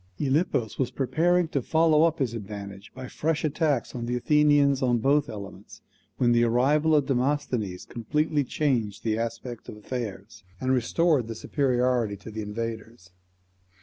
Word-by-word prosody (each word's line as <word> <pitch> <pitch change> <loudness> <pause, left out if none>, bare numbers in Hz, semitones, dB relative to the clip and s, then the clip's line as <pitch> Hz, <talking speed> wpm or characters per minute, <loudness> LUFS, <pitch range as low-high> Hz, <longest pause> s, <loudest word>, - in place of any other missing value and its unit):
Gylippus 140 - 0
was 130 - +1
preparing 170 +6 +1
to 140 - -1
follow 160 +3 +3
up 165 -1 +1
his 125 -4 -1
advantage 100 -2 -8
by 130 0 -7
fresh 155 +4 -2
attacks 150 -4 0
on 120 -1 -4
the 125 - -1
Athenians 145 +1 +3
on 125 -2 +2
both 140 +5 +2
elements, 100 -2 -10 0.3
when 120 -2 +3
the 120 0 +4
arrival 145 +7 +3
of 145 -2 +3
Demosthenes 125 -7 -1
completely 150 +5 -1
changed 120 -7 -1
the 110 -1 0
aspect 115 +1 -5
of - - -9
affairs, 105 -2 -6 0.2
and 130 - 0
restored 130 +1 +2
the 115 - -5
superiority 125 -5 0
to 100 +4 -10
the 110 +1 -5
invaders. 110 -1 -6
125 Hz, 150 wpm, -26 LUFS, 110-145 Hz, 0.3 s, the